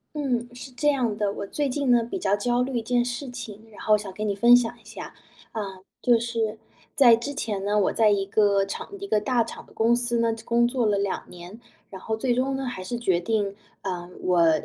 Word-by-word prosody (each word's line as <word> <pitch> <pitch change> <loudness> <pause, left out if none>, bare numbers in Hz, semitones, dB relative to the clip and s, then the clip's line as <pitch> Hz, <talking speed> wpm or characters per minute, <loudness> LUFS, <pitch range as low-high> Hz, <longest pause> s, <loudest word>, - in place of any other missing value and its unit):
嗯， 250 -5 -1
是 250 +2 -9
这 295 +4 +1
样 245 -7 0
的， 205 -1 0
我 200 - -5
最 290 +7 -1
近 275 0 -1
呢 240 -1 +5
比 240 +12 -4
较 200 - +2
焦 240 +4 0
虑 255 0 -1
一 230 - -2
件 245 +1 +2
事 245 +3 -4
情， 215 -3 -8
然 210 - -12
后 215 -1 +4
想 205 -2 -7
跟 210 +2 -3
你 200 - 0
分 235 +4 +7
享 240 -2 +2
一 225 - -25
下。 - - -9 0.4
呃， 195 -4 -5 0.2
就 240 -2 +5
是， 225 -2 -2 0.4
在 240 -4 +7
之 240 +5 -5
前 205 -7 -3
呢， 210 +1 +2
我 200 - +2
在 220 -2 +4
一 200 -1 +2
个 200 -1 +3
厂 195 - -6
一 400 - -6
个 215 - +2
大 235 +2 +1
厂 - - -9
的 - - -20
公 230 +2 +3
司 240 -1 +1
呢 230 0 +2
工 235 0 +3
作 245 -1 0
了 205 -2 +2
2 200 -1 -2
年， 180 +5 -11 0.3
然 190 - -9
后 220 +3 -2
最 240 +2 0
终 265 +2 0
呢， 270 0 -3
还 220 -7 -5
是 235 +6 -4
决 190 -7 +2
定， 200 +1 -1 0.3
呃， 180 -2 -5
我 170 -3 +4
225 Hz, 250 characters per minute, -25 LUFS, 200-245 Hz, 0.4 s, 分